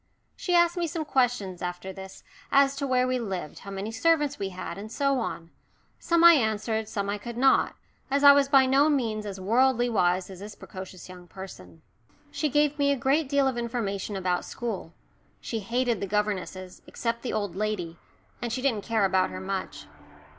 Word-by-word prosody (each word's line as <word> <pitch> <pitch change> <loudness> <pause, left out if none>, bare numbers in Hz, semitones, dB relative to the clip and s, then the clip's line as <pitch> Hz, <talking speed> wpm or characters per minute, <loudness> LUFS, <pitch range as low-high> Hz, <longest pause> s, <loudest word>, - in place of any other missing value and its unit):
She 360 - -1
asked 345 +1 +4
me 345 -1 0
some 320 0 -4
questions 245 -10 0
after 180 +1 -5
this 190 0 -10 0.3
as 275 0 +4
to 280 -1 -2
where 255 -1 +2
we 255 0 0
lived, 190 -9 -5
how 200 - -10
many 195 +2 -4
servants 295 +3 +1
we 195 -1 -2
had, 185 +1 -7
and 215 +2 -8
so 275 +1 +1
on. 170 -7 -5 0.5
Some 340 0 +2
I 340 0 +10
answered 220 -4 0
some 200 -1 -2
I 205 +1 -2
could 235 +2 -7
not, 265 +1 +3 0.3
as 280 +1 +1
I 285 - +11
was 280 -1 +4
by 270 -2 +6
no 275 +3 +4
means 225 -7 -1
as 195 -1 -6
worldly 245 +4 +2
wise 185 -2 +1
as 185 - -10
this 205 +1 -9
precocious 185 -1 -10
young 180 -1 -12
person. 90 - -11 0.5
She 305 +1 -1
gave 295 +1 +2
me 280 0 +3
a 280 - +1
great 275 +3 +1
deal 280 -1 +3
of 255 -2 -1
information 215 -4 -3
about 180 -2 -1
school 220 -8 -5 0.5
she 225 - -4
hated 235 +1 0
the 200 - -2
governesses, 190 -2 -3
except 230 0 -3
the 250 - -4
old 205 -5 -2
lady, 190 -5 -3 0.4
and 240 -1 -3
she 255 +2 -3
didn't 230 -7 +1
care 225 -3 +1
about 185 -1 +2
her 95 - -6
much. 95 - -5
225 Hz, 195 wpm, -27 LUFS, 190-270 Hz, 0.5 s, I